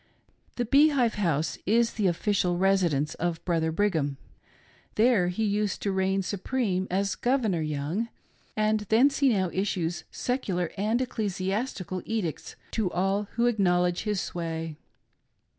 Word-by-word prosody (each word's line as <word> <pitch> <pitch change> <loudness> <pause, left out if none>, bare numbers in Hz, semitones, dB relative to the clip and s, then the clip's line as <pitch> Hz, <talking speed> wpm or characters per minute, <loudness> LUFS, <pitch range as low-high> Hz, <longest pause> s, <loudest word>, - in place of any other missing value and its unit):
The 245 - -1
Bee 285 +6 +6
Hive 250 -6 +2
House 165 -6 -1
is 230 +3 +3
the 210 -3 +1
official 180 0 +1
residence 175 -6 +2
of 170 -1 -3
Brother 165 -2 +1
Brigham. 160 -7 0 0.8
There 220 -5 +4
he 180 +5 -1
used 205 -1 0
to 200 - 0
reign 190 0 +1
supreme 195 -1 -1
as 195 +2 0
"Governor" 235 -9 0
Young; 155 +9 -2 0.5
and 215 0 +2
thence 265 +6 +4
he 280 -2 +5
now 190 -6 +1
issues 175 -4 -1
secular 190 -9 -2
and 215 +4 0
ecclesiastical 195 -3 -3
edicts 210 -8 -3 0.2
to 215 -5 0
all 195 +3 0
who 235 +1 +1
acknowledge 180 -6 +2
his 210 -3 -1
sway. 165 -3 -4
195 Hz, 135 wpm, -27 LUFS, 175-220 Hz, 0.8 s, Bee